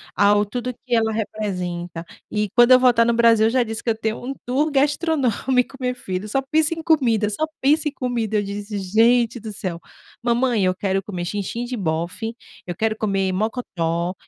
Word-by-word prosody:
ao 205 +1 +4
tudo 245 +4 -4
que 245 - -3
ela 225 -1 +2
representa, 180 -6 -4 0.2
e 210 -1 -1
quando 240 +1 +6
eu 255 - +9
voltar 240 -2 +4
no 235 - +2
Brasil 230 -1 +5
eu - - +2
já 255 +1 +2
disse 225 0 -5
que 235 - -2
eu 225 - 0
tenho 220 +1 -3
um 270 +2 -3
tour 275 +5 +1
gastronômico, 275 -3 +1
minha 250 -1 -1
filha, 190 -3 -5
só 270 +6 0
penso 315 +1 +3
em 325 - -7
comida, 235 -10 +2
só 265 +10 -1 0.2
penso 300 +3 +3
em - - -1
comida, 240 -5 -2
eu 205 - +1
disse: 205 +1 -5
"Gente 230 +5 +2
do 220 0 -7
céu, 185 -5 -5 0.4
mamãe, 235 -3 +1
eu 185 - +1
quero 195 0 -1
comer 180 -3 -5
xinxin 205 +5 -3
de 245 0 -4
bofe, 175 +6 -3 0.3
eu 175 - -4
quero 220 +3 0
comer 195 -3 0
mocotó, 180 -5 -2
225 Hz, 195 wpm, -22 LUFS, 200-250 Hz, 0.4 s, eu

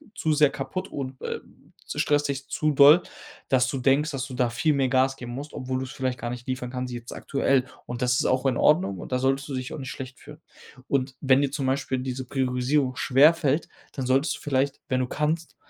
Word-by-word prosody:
zu 155 - +1
sehr 150 -1 +5
kaputt 185 +8 -5
und, 130 -2 -6
äh, - - -4 0.5
stresst 145 0 +1
dich 140 0 -4
zu 155 0 0
doll, 145 +5 +8 0.5
dass 130 -1 +3
du 135 - -2
denkst, 140 +4 +2
dass 135 -1 -3
du 130 - -9
da 125 -2 +1
viel 150 +6 +1
mehr 135 -2 +1
Gas 130 +1 +2
geben 120 -1 -7
musst, 140 +4 -7
obwohl 130 0 -3
du's 130 0 -5
vielleicht 130 -3 -2
gar 120 - -4
nicht 120 0 -7
liefern 130 -1 -3
kannst 125 -1 -4
jetzt 120 0 -7
aktuell 135 -2 +1 0.2
und 120 +1 -5
das 125 0 +2
ist - - 0
auch 130 +1 +1
in 130 -3 +2
Ordnung 100 - +3
und - - -9
da 125 - +2
solltest 135 +1 0
du 135 - -3
dich 130 -1 -4
auch - - -5
nicht 130 -2 -6
schlecht 130 +1 -8
fühlen. 150 +1 -13 0.5
Und 130 -1 0
wenn 135 -1 +4
dir 140 -1 0
zum 140 -2 -2
Beispiel 130 -1 -1
diese 130 0 -4
Priorisierung 130 +1 0
schwer 140 +5 +5
fällt, 150 -1 0 0.2
dann 135 - -4
solltest 135 +4 +2
du - - -16
vielleicht, 135 -1 0
wenn 130 -1 +1
du 130 - -1
kannst, 155 +4 -2
135 Hz, 230 wpm, -25 LUFS, 130-140 Hz, 0.5 s, doll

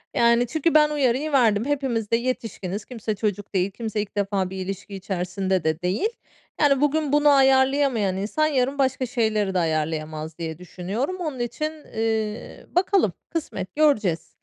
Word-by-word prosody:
Yani, 235 +1 +4
çünkü 315 +5 0
ben 300 -1 +6
uyarıyı 285 0 +1
verdim. 230 -5 +3
Hepimiz 265 -7 -1
de - - +5
yetişkiniz, 225 -5 -4
kimse 225 -3 -4
çocuk 205 -1 -3
değil, 190 +1 +1
kimse 220 0 -3
ilk 205 -1 -8
defa 195 -2 0
bir 190 - -7
ilişki 195 +2 -5
içerisinde 190 -1 -2
de 160 +1 0
değil. 185 - 0 0.5
Yani, 275 -2 +4
bugün 295 0 +1
bunu 295 0 +5
ayarlayamayan 265 -6 +3
insan 215 +11 0
yarın 270 -1 0
başka 265 -1 +1
şeyleri 220 -5 0
de 185 - +2
ayarlayamaz 155 -1 -2
diye 160 -2 -5
düşünüyorum. 190 - -4
Onun 310 -8 -4
için, 240 +6 -2 0.2
eee, 220 0 -2
bakalım, 360 - +3 0.2
kısmet 195 - -4
göreceğiz. 220 - +2
225 Hz, 155 wpm, -24 LUFS, 190-275 Hz, 0.5 s, ben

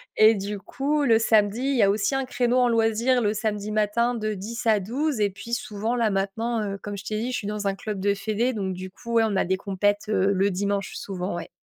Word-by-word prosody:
et 215 +1 +7
du 205 0 -4
coup 280 +9 -1
le 230 -5 +4
samedi 220 -1 +3
il 275 +1 +1
y - - +5
a 200 - +5
aussi 205 +6 0
un 270 0 0
créneau 245 -1 +1
en 250 -1 +4
loisir 230 +2 +2
le 210 -1 +1
samedi 210 -1 -2
matin 215 +3 +1
de 215 -2 -2
10 225 +5 -6
à 220 -2 +4
12 260 +7 -2
et 205 - +3
puis 215 +4 -9
souvent 225 0 -2
là 230 -3 +2
maintenant, 215 +4 -1
heu, 200 -1 -4
comme 205 -1 -5
je 195 - -8
t'ai 215 0 -3
dit, 240 +3 -2
je 245 - -1
suis 200 - -5
dans 210 -1 -2
un 195 - 0
club 205 0 -5
de 200 +1 +1
fédé 220 +5 -1
donc 195 -4 -2
du 185 +1 -7
coup, 235 +5 -8
ouais, 230 -1 +5
on 205 - -2
a 190 - +2
des 190 +1 0
compètes, 205 +2 -1
heu, 195 -2 +2
le 195 +1 +2
dimanche 200 0 -2
souvent, 185 -2 -4
ouais. 175 - -6
215 Hz, 260 wpm, -25 LUFS, 200-235 Hz, -, et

